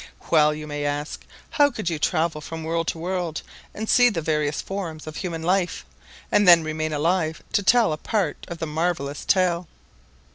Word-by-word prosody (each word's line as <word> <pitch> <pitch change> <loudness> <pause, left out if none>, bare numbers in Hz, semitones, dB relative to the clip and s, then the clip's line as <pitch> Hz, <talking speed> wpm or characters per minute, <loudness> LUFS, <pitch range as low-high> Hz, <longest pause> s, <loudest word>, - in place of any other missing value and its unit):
Well 150 -2 +5
you 155 0 -7
may 145 -1 -4
ask: 145 +1 -3 0.3
"How 290 -1 +4
could 215 -9 -6
you 160 - -3
travel 160 0 0
from 160 +1 -7
world 165 +1 -1
to - - -1
world 175 -2 -3 0.3
and 220 +1 -5
see 245 +2 +6
the 195 -8 -2
various 150 -2 -1
forms 175 -6 -5
of 155 0 -7
human 170 -4 -4
life, 180 +1 0 0.5
and 205 - +4
then 170 -2 +8
remain 155 0 -2
alive 160 +2 0
to - - +3
tell 225 -3 +4
a - - -4
part 195 -4 -2
of 170 - -6
the 165 - -3
marvelous 155 -2 -2
tale?" 180 -2 +2
165 Hz, 185 wpm, -24 LUFS, 155-185 Hz, 0.5 s, then